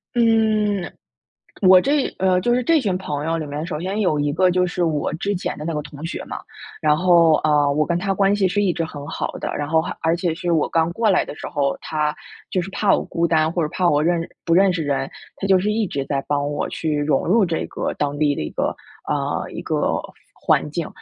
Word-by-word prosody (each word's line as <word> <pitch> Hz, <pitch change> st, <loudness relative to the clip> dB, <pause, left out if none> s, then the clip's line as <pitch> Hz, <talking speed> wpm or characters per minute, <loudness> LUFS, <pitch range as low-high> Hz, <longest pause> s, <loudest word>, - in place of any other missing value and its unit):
嗯， 215 Hz, -4 st, +2 dB, 0.7 s
我 185 Hz, -1 st, +8 dB
这 280 Hz, 0 st, +1 dB
呃， 185 Hz, -1 st, +3 dB
就 240 Hz, +3 st, +2 dB
是 250 Hz, -, +2 dB
这 325 Hz, +3 st, +4 dB
群 200 Hz, -7 st, -1 dB
朋 150 Hz, -5 st, -4 dB
友 165 Hz, +1 st, 0 dB
里 155 Hz, -, -4 dB
面， 150 Hz, +3 st, -4 dB
首 155 Hz, -3 st, -4 dB
先 190 Hz, +5 st, -3 dB
有 165 Hz, -7 st, +1 dB
一 145 Hz, 0 st, 0 dB
个 180 Hz, +2 st, +3 dB
就 180 Hz, 0 st, +2 dB
是 175 Hz, 0 st, -2 dB
我 155 Hz, -3 st, 0 dB
之 200 Hz, +5 st, -2 dB
前 180 Hz, -, -4 dB
的 150 Hz, -, -6 dB
那 165 Hz, -, -2 dB
个 150 Hz, -, -2 dB
同 145 Hz, +2 st, -9 dB
学 -, -, -5 dB
嘛。 -, -, -6 dB, 0.4 s
然 150 Hz, -1 st, +4 dB
后， 170 Hz, -1 st, +5 dB
呃， 145 Hz, -2 st, +3 dB
我 155 Hz, +1 st, +1 dB
跟 170 Hz, 0 st, 0 dB
他 195 Hz, +2 st, -1 dB
关 195 Hz, +1 st, +2 dB
系 195 Hz, -2 st, +2 dB
是 205 Hz, +3 st, 0 dB
一 190 Hz, -3 st, +2 dB
直 165 Hz, -, -2 dB
很 145 Hz, -2 st, -8 dB
好 -, -, -3 dB
的， -, -, -3 dB
然 145 Hz, -1 st, -3 dB
后 160 Hz, +1 st, +3 dB
还 -, -, -5 dB
而 165 Hz, +1 st, +2 dB
且 175 Hz, -2 st, -1 dB
是 175 Hz, -1 st, -2 dB
我 160 Hz, -3 st, +2 dB
刚 165 Hz, 0 st, +1 dB
过 220 Hz, +3 st, +1 dB
来 185 Hz, -, +3 dB
的 -, -, -7 dB
时 -, -, -7 dB
候， 140 Hz, -3 st, 0 dB
他 150 Hz, -1 st, -1 dB, 0.4 s
就 185 Hz, -, +1 dB
是 185 Hz, -, -6 dB
怕 205 Hz, -, +1 dB
我 -, -, +1 dB
孤 170 Hz, -, -1 dB
单， 160 Hz, -1 st, +2 dB
或 170 Hz, -1 st, -1 dB
者 150 Hz, -, -2 dB
怕 175 Hz, +1 st, 0 dB
我 145 Hz, +1 st, +2 dB
认 170 Hz, 0 st, +1 dB, 0.2 s
不 165 Hz, -, +2 dB
认 190 Hz, +1 st, +5 dB
识 165 Hz, -3 st, -2 dB
人， 140 Hz, -1 st, -1 dB, 0.3 s
他 195 Hz, -, -3 dB
就 190 Hz, -, +5 dB
是 205 Hz, +3 st, 0 dB
一 215 Hz, -2 st, 0 dB
直 140 Hz, -3 st, -3 dB
在 140 Hz, -1 st, -2 dB
帮 145 Hz, 0 st, 0 dB
我 145 Hz, -, -2 dB
去 155 Hz, -2 st, -2 dB
融 145 Hz, -2 st, +1 dB
入 205 Hz, +3 st, +4 dB
这 165 Hz, -2 st, -2 dB
个 -, -, -3 dB
当 145 Hz, 0 st, -2 dB
地 145 Hz, -2 st, +2 dB
的 -, -, -4 dB
一 -, -, -4 dB
个， -, -, -1 dB, 0.3 s
呃， -, -, -2 dB
一 -, -, -6 dB
个 -, -, 0 dB, 0.3 s
环 -, -, +1 dB
境， 160 Hz, +1 st, -3 dB
170 Hz, 270 characters per minute, -21 LUFS, 150-190 Hz, 0.7 s, 我